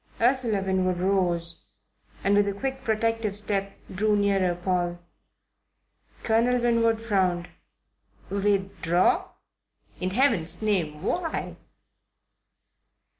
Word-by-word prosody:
Ursula 235 -5 +3
Winwood 185 -1 0
rose 175 -3 0 0.6
and, 200 - +2
with 205 0 +4
a 200 - -1
quick 265 +4 -4
protective 225 -2 0
step, 200 -1 -3 0.2
drew 210 +3 +1
nearer 195 -3 +1
Paul. 175 -1 -1 1.3
Colonel 235 +2 +2
Winwood 230 -1 +2
frowned. 185 -5 0 0.8
"Withdraw? 195 -3 +1 0.7
In 185 - -1
Heaven's 205 - +1
name 170 -7 -1
why?" 335 - -2
200 Hz, 90 wpm, -26 LUFS, 185-225 Hz, 1.3 s, with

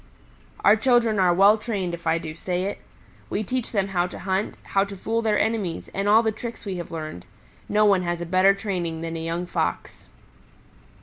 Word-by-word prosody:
"Our 205 - +8
children 230 -2 +2
are 180 -2 +4
well 200 +5 +5
trained 200 -6 -3
if 170 -1 -6
I 160 0 +3
do 160 -2 -6
say 180 +2 -2
it. 200 - -3 0.5
We 215 - -1
teach 250 +3 -3
them 195 -3 0
how 180 -2 +1
to - - -9
hunt, 190 +2 -2
how 195 - +1
to 200 0 -7
fool 225 +4 -1
their 215 -2 +1
enemies, 210 -6 -1
and 195 +1 0
all 220 +2 +6
the 220 - +1
tricks 230 +2 -8
we 190 -2 -3
have 175 - -6
learned. 155 - -6 0.5
No 210 +1 +3
one 200 -3 +4
has 175 -1 -2
a 175 - -4
better 185 +3 +4
training 180 -6 -3
than 165 0 -4
a 160 - -4
young 165 +2 -2
Fox." 85 - -3
195 Hz, 205 wpm, -24 LUFS, 175-215 Hz, 0.5 s, Our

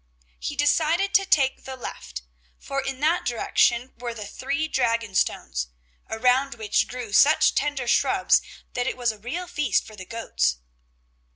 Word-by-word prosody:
He 290 - -4
decided 320 +6 +2
to 390 -2 +4
take 275 -7 +2
the 265 - -7
left, 65 - -8 0.3
for 275 0 -3
in 270 0 -5
that 325 +4 +2
direction 240 +1 +1
were 240 -1 -5
the 210 -2 -6
three 320 +8 -2
Dragon 230 -7 0
stones, 65 - 0 0.4
around 250 +4 +2
which 220 -3 0
grew 245 -4 -7
such 310 +6 +5
tender 285 -4 -1
shrubs - - +3 0.3
that 245 0 -1
it - - -2
was 240 -2 +1
a 215 - -13
real 280 - -4
feast 295 - 0
for 215 - -12
the 190 -2 -10
goats. 230 - -1
250 Hz, 160 wpm, -25 LUFS, 230-295 Hz, 0.4 s, such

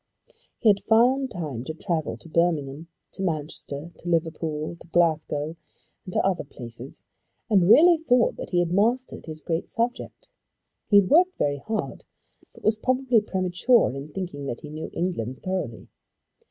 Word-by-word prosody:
He 225 - +3
had 200 -1 +4
found 255 +4 +3
time 150 - -5
to 155 - -5
travel 160 -1 -2
to - - -15
Birmingham, 160 -3 0 0.2
to - - -8
Manchester, 155 -2 -4
to 175 - -6
Liverpool, 160 -1 -1
to - - -13
Glasgow, 160 -2 +1 0.5
and 185 - -8
to - - +1
other 190 -2 +1
places, 120 -2 -10 0.5
and 190 -3 +4
really 335 +7 +7
thought 250 -7 +3
that - - -6
he 180 - 0
had 175 -1 +2
mastered 235 +5 0
his 155 -1 -7
great 165 +1 -2
subject. 240 +2 -3 0.6
He 205 -2 +7
had 185 - -4
worked 360 +5 +5
very 145 -1 0
hard, 215 +8 -4 0.5
but - - -18
was 215 0 +2
probably 255 -1 +2
premature 190 - +2
in 140 +2 -6
thinking 145 -6 -5
that 120 - -5
he 150 - -9
knew 155 +1 -6
England 130 -9 -3
thoroughly. 185 -12 -3
175 Hz, 160 wpm, -25 LUFS, 150-220 Hz, 0.6 s, really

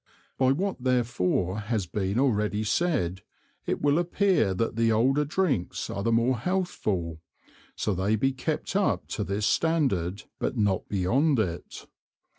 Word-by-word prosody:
By 130 0 +4
what 180 -2 -2
therefore 115 -7 +1
has 105 -2 -2
been 95 +3 -2
already 105 -5 +1
said, 105 - 0 0.5
it - - -2
will 145 +2 +3
appear 175 - +2
that 115 +3 -1
the 115 0 +2
older 135 +7 +3
Drinks 145 - -1
are 100 - -3
the 115 - +1
more 115 +1 +2
healthful, 105 - -2 0.5
so 105 - -1
they 95 +4 +1
be 135 +5 +1
kept 155 +7 -3
up 200 0 +1
to 105 - -2
this 100 +1 -2
Standard, 105 - +1 0.2
but 130 - -2
not 100 -4 0
beyond 125 - +2
it. 90 -6 -3
115 Hz, 145 wpm, -27 LUFS, 100-145 Hz, 0.5 s, By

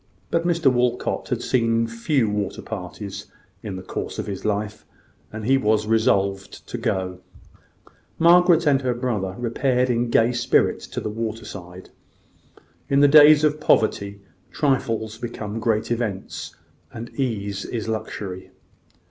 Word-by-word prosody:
But 170 +1 +1
Mr 165 -6 +3
Walcot 125 0 -1
had - - -2
seen 115 -2 +1
few 115 +2 0
water 105 -2 -3
parties 100 0 -7 0.3
in 100 -3 -6
the 95 - -7
course - - -5
of - - -3
his 100 -2 -6
life, 105 0 -2 0.5
and 110 -1 -6
he 135 +3 +3
was 110 -3 +1
resolved 100 -3 0
to - - -4
go. 95 -1 -2 1.0
Margaret 170 0 +5
and 140 -2 +3
her 125 -2 -1
brother 105 -7 -2
repaired 125 +1 0
in 120 0 0
gay 115 +1 +3
spirits 120 -1 +1
to - - -5
the 105 - -4
water 115 0 -4
side. 90 -2 -10 1.0
In 140 0 +3
the 145 - +7
days 150 +1 +8
of 150 0 +2
poverty, 100 -7 +1 0.3
trifles 115 -6 -1
become 115 -2 -5
great 110 0 0
events, 110 -5 -4 0.4
and 115 +1 -8
ease 105 -7 -3
is 115 -2 -4
luxury. 105 -4 -5
115 Hz, 140 wpm, -23 LUFS, 105-130 Hz, 1.0 s, days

